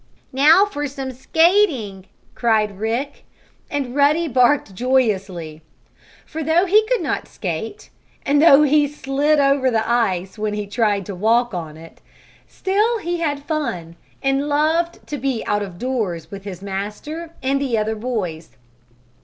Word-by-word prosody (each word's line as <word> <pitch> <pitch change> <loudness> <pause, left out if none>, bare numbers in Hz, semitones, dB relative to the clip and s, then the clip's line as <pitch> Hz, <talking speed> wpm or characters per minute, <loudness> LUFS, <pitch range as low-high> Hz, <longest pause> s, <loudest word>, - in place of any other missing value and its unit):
"Now 310 +9 +6
for 290 -8 -4
some 270 -1 -6
skating!" 265 - +1 0.3
cried 215 -4 0
Rick. 235 +6 -3 0.5
And 275 -4 -3
Ruddy 300 +4 +3
barked 250 -4 +2
joyously. 195 -9 -1 0.6
For, 320 - -6
though 325 +4 +3
he 420 +4 +4
could - - 0
not - - -2
skate, 185 +3 -6 0.3
and 285 +1 +3
though 300 -2 +7
he 295 0 +3
slid 290 +1 0
over 275 -1 +3
the 225 -2 0
ice 195 -5 0
when 210 -1 -2
he 210 0 -3
tried 205 -2 0
to 200 - -6
walk 230 +5 +1
on 160 -3 -6
it, 165 +1 -14 0.5
still 425 +5 0
he 350 -4 -3
had 290 -4 -2
fun, 185 - -3 0.3
and 270 +2 0
loved 320 +4 0
to 290 - -5
be 255 -3 -2
out 205 0 0
of 190 -4 -6
doors 215 -9 -3
with 195 0 -9
his 190 -2 -7
master 210 +13 -6
and 275 +1 +1
the 255 -5 0
other 215 +1 0
boys. 210 - -5
255 Hz, 150 wpm, -20 LUFS, 205-295 Hz, 0.6 s, though